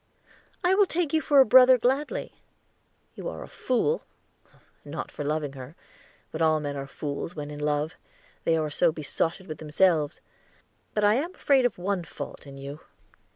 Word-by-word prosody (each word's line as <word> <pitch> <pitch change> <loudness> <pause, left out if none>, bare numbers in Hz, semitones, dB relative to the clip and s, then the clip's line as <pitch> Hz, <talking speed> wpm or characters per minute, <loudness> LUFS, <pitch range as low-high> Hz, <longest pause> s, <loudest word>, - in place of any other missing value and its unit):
"I 360 +1 +4
will 400 0 +4
take 330 -3 -1
you 315 - +3
for 290 -3 +4
a - - +6
brother 255 +2 +8
gladly. 275 - -1 0.8
You - - -5
are - - -7
a - - -10
fool 350 - 0 0.8
not - - -6
for - - -5
loving 150 -1 -2
her, 135 +3 -10 0.6
but 160 - -5
all 155 -1 +4
men 145 -1 -4
are 140 0 -5
fools 145 +4 -5
when 150 -1 -6
in 145 - -7
love, 150 +2 0 0.5
they 165 - +2
are 155 -1 -1
so 145 - +3
besotted 165 +4 -2
with 155 -4 -7
themselves. 155 -1 +2 0.8
But 210 - +1
I 205 0 +5
am 335 +7 -3
afraid 265 -3 +4
of - - -10
one 185 0 -1
fault 155 - -8
in 135 0 -10
you." 140 +2 -8
165 Hz, 175 wpm, -27 LUFS, -, 0.8 s, brother